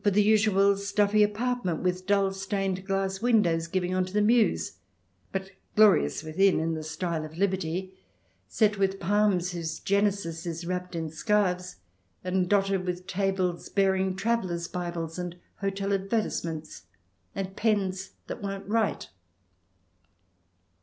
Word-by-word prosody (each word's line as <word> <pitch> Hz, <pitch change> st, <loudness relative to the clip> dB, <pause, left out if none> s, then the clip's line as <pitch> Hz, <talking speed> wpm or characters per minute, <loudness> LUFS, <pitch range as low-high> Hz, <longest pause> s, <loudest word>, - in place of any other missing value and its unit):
XX] -, -, -32 dB
TRIER 210 Hz, +1 st, +5 dB
279 210 Hz, -, +4 dB
usual 200 Hz, -2 st, +4 dB
stuffy 200 Hz, +1 st, +2 dB
apartment 210 Hz, -4 st, 0 dB
with 185 Hz, 0 st, -1 dB
dull 200 Hz, -1 st, +3 dB
stained 195 Hz, -1 st, -2 dB
glass 195 Hz, 0 st, -1 dB
windows 180 Hz, -9 st, +3 dB
giving 180 Hz, +1 st, -1 dB
on 185 Hz, 0 st, +2 dB
to 185 Hz, -, -9 dB
the 210 Hz, -, +2 dB
mews, 210 Hz, -, +2 dB, 0.5 s
but 190 Hz, 0 st, -4 dB, 0.2 s
glorious 210 Hz, -7 st, +4 dB
within 185 Hz, +4 st, +3 dB
in 165 Hz, +1 st, 0 dB
the 160 Hz, -, -3 dB
style 160 Hz, +1 st, -3 dB
of 155 Hz, +1 st, -9 dB
Liberty, 190 Hz, -1 st, -1 dB, 0.5 s
set 210 Hz, -2 st, +2 dB
with 195 Hz, 0 st, +1 dB
palms 195 Hz, -1 st, +2 dB
whose 165 Hz, -2 st, -4 dB
genesis 200 Hz, -5 st, 0 dB
is 170 Hz, 0 st, -4 dB
wrapped 180 Hz, 0 st, -3 dB
in 160 Hz, -2 st, -3 dB
scarves, 180 Hz, 0 st, 0 dB, 0.5 s
and 180 Hz, 0 st, 0 dB
dotted 195 Hz, -2 st, +2 dB
with 180 Hz, 0 st, -4 dB
tables 190 Hz, -2 st, -1 dB
bearing 190 Hz, -1 st, +2 dB
travellers' 190 Hz, -5 st, -1 dB
Bibles 170 Hz, -2 st, -4 dB
and 175 Hz, -1 st, -4 dB, 0.2 s
hotel 195 Hz, 0 st, -2 dB
advertise 195 Hz, +3 st, 0 dB
ments, 155 Hz, -, -7 dB, 0.5 s
and 195 Hz, 0 st, -4 dB
pens 195 Hz, -4 st, 0 dB
that -, -, -6 dB
won't 195 Hz, -1 st, -5 dB
write. 220 Hz, 0 st, 0 dB
190 Hz, 140 wpm, -28 LUFS, 175-200 Hz, 0.5 s, TRIER